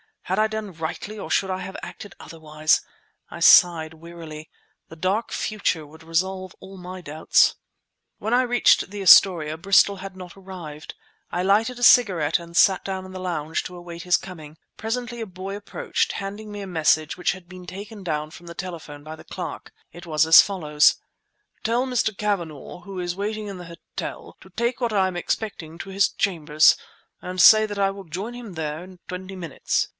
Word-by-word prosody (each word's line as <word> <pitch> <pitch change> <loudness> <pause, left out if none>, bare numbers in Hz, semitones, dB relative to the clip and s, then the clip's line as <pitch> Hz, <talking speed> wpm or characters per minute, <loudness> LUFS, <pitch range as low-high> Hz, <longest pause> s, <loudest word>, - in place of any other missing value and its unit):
Had 190 +3 -1
I 215 - +4
done 220 -2 -5
rightly 165 +6 -5
or - - -7
should 195 - +1
I 185 - -2
have 190 +1 -7
acted 205 - -9
otherwise? 155 -1 0 0.5
I - - -9
sighed 160 -3 +6
wearily. 160 -2 -10 0.4
The 165 - -12
dark 190 +7 -1
future 200 -7 -1
would 160 +2 -15
resolve 185 +3 -2
all 195 0 -11
my 185 0 -8
doubts. 155 -1 +3 0.6
When 220 +3 -2
I 250 +1 +4
reached 245 -6 +3
the 205 0 -6
Astoria, 165 -4 +6
Bristol 195 +3 +4
had 195 0 -8
not 180 0 -11
arrived. 175 -6 -9 0.4
I 180 - -1
lighted 220 +6 +2
a - - -4
cigarette 190 -14 +5
and 170 0 -12
sat 190 +1 +5
down 190 -1 -4
in 185 - -10
the 185 - -7
lounge 165 -4 -2
to 180 - -8
await 170 -1 -9
his 180 -1 +3
coming. 160 -5 -7 0.2
Presently 240 +1 -4
a 225 - -3
boy 190 0 -7
approached, 205 - -2
handing 205 +2 -6
me 205 0 -7
a 195 - -6
message 155 -3 +1
which 180 - +1
had 185 -2 -13
been 180 -1 -11
taken 200 +4 -8
down 155 -4 -3
from 170 +2 -13
the 170 - -9
telephone 165 -6 -7
by 155 +1 -8
the - - -14
clerk. - - -7 0.2
It 175 +1 -11
was 155 -2 +2
as 160 +1 +10
follows— 150 -7 +3 0.7
Tell 235 +3 +1
Mr. 240 -5 0
Cavanagh, 175 -5 -3
who 195 -2 -7
is 175 0 -3
waiting 210 +1 -3
in 195 -2 -6
the 180 - -9
hotel, - - -8
to - - -16
take 235 +1 -1
what 235 -3 -1
I 190 -2 +3
am 185 -1 -4
expecting 175 -4 -4
to 195 - -7
his 195 +1 +3
chambers, 155 -5 +3 0.4
and 185 0 -6
say 215 +4 +8
that 205 -1 -6
I 195 -1 +2
will 195 0 -10
join 190 +9 -5
him 240 -5 -9
there 155 -1 -4
in 185 -1 -14
twenty 185 +1 -6
minutes. 170 -7 -2
185 Hz, 190 wpm, -24 LUFS, 165-200 Hz, 0.7 s, as